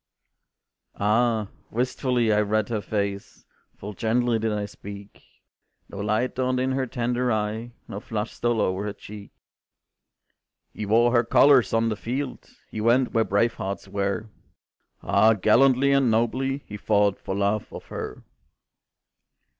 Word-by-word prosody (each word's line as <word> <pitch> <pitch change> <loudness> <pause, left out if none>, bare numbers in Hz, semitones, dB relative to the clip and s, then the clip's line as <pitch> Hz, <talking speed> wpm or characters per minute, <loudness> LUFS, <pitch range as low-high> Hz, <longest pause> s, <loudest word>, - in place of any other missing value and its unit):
Ah! 110 0 +1 0.2
wistfully 125 -1 0
I 105 - +3
read 105 0 0
her 110 -3 -1
face, 100 -1 -4 0.3
Full 105 +2 -7
gently 115 +3 +1
did 110 0 -1
I 105 -1 -2
speak, 100 0 -11 0.7
No 100 - -8
light 110 +5 0
dawned 130 0 0
in 130 +1 0
her 130 0 -1
tender 125 0 -1
eye, 110 +2 -2
No 100 - -6
flush 105 0 -4
stole 120 -2 0
o'er 95 +2 -1
her 105 - -3
cheek. 105 0 -11 1.4
"He 105 - -5
wore 115 +3 +4
her 120 -1 +4
colors 130 -1 +5
on 115 0 +2
the 110 - -1
field, 130 +5 -5 0.2
He 110 - -4
went 120 +3 +3
where 115 -2 +3
brave 110 +3 +1
hearts 100 +1 -5
were; 100 +2 -2 0.7
Ah, 110 +3 +4
gallantly 130 +6 +4
and 135 -3 +3
nobly 130 +5 0
He 105 - -8
fought 100 -1 +1
for 95 - -4
love 100 +1 -1
of - - -9
her. - - -6
110 Hz, 145 wpm, -25 LUFS, 105-120 Hz, 1.4 s, colors